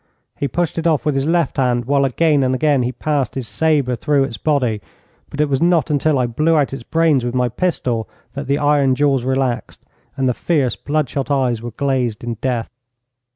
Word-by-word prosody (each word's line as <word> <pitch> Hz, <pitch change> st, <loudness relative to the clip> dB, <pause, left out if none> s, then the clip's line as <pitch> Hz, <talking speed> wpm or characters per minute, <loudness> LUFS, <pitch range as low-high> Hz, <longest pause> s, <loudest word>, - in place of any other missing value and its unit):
He 140 Hz, -, -2 dB
pushed 170 Hz, +4 st, -2 dB
it 165 Hz, -, 0 dB
off 155 Hz, -2 st, +1 dB
with 150 Hz, -, +1 dB
his 135 Hz, +1 st, -1 dB
left 170 Hz, -3 st, +1 dB
hand, 125 Hz, -2 st, +1 dB
while 140 Hz, +1 st, +2 dB
again 145 Hz, +2 st, +2 dB
and 130 Hz, 0 st, +1 dB
again 145 Hz, -1 st, +2 dB
he 125 Hz, +1 st, -1 dB
passed 140 Hz, -3 st, -2 dB
his 130 Hz, -4 st, -4 dB
sabre 140 Hz, +2 st, +1 dB
through 140 Hz, +3 st, +1 dB
its 130 Hz, -4 st, -4 dB
body, 125 Hz, -8 st, 0 dB, 0.5 s
but 145 Hz, -, -9 dB
it 150 Hz, -, +3 dB
was 135 Hz, -1 st, -1 dB
not 170 Hz, -2 st, +2 dB
until 150 Hz, 0 st, +2 dB
I 125 Hz, -, +2 dB
blew 155 Hz, +8 st, +1 dB
out 140 Hz, -2 st, +1 dB
its 135 Hz, -, -5 dB
brains 160 Hz, 0 st, +2 dB
with 120 Hz, +1 st, -3 dB
my 125 Hz, -1 st, +1 dB
pistol 125 Hz, -6 st, -2 dB, 0.2 s
that 140 Hz, 0 st, -5 dB
the 140 Hz, +1 st, +1 dB
iron 145 Hz, -3 st, +2 dB
jaws 135 Hz, -2 st, +1 dB
relaxed, 130 Hz, -1 st, -2 dB, 0.3 s
and 135 Hz, -1 st, +1 dB
the 125 Hz, -, +2 dB
fierce, 135 Hz, -4 st, 0 dB
bloodshot 145 Hz, -2 st, -2 dB
eyes 130 Hz, -5 st, +1 dB
were 120 Hz, -, -5 dB
glazed 125 Hz, -3 st, -1 dB
in 120 Hz, 0 st, -3 dB
death. 125 Hz, -3 st, -2 dB
135 Hz, 205 wpm, -19 LUFS, 125-150 Hz, 0.5 s, it